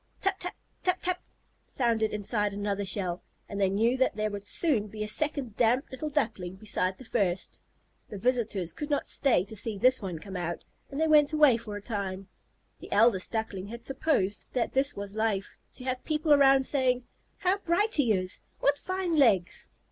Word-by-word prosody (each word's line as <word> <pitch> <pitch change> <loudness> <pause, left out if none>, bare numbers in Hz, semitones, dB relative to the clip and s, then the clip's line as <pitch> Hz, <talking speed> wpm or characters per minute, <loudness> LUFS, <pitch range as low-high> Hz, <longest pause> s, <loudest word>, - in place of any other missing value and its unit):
"Tap 390 -1 0
tap, 360 - -5 0.3
tap 365 - +1
tap," 365 0 -1 0.5
sounded 230 -4 0
inside 210 0 -1
another 205 0 -2
shell, 185 -2 -1 0.3
and 200 0 -4
they 195 - +3
knew 225 +6 +2
that 260 -4 +1
there 215 0 -1
would 205 0 -6
soon 250 -10 +2
be 215 +1 -5
a - - -4
second 245 +1 0
damp 245 +4 +3
little 285 +4 -4
Duckling 215 - -2
beside 190 -2 -1
the 260 - -12
first. 195 -6 -1 0.5
The 205 - -6
visitors 220 -6 0
could 295 - -5
not 290 - 0
stay 250 -10 +3
to 220 - -9
see 215 0 -2
this 255 +5 +4
one 185 -4 -4
come 190 +4 -9
out, 175 -1 -3 0.3
and 280 - -5
they 320 - +3
went 300 -1 +5
away 300 -5 +6
for 220 -2 -6
a 205 - -7
time. 195 -4 -4 0.5
The - - -12
eldest 210 -3 +3
Duckling 210 -4 -3
had 235 +2 -8
supposed 265 -8 0
that 245 -2 -1
this 270 +1 +2
was 200 0 -6
life, 220 -3 -1
to 255 - -7
have 255 0 -3
people 310 0 +2
around 270 -1 +5
saying, 255 -3 +1 0.3
"How 380 +1 +1
bright 405 +4 +1
he 265 -7 +3
is!" 185 -2 -1 0.2
"What 285 0 +2
fine 370 -3 -1
legs!" 205 - +2
225 Hz, 190 wpm, -28 LUFS, 200-280 Hz, 0.5 s, away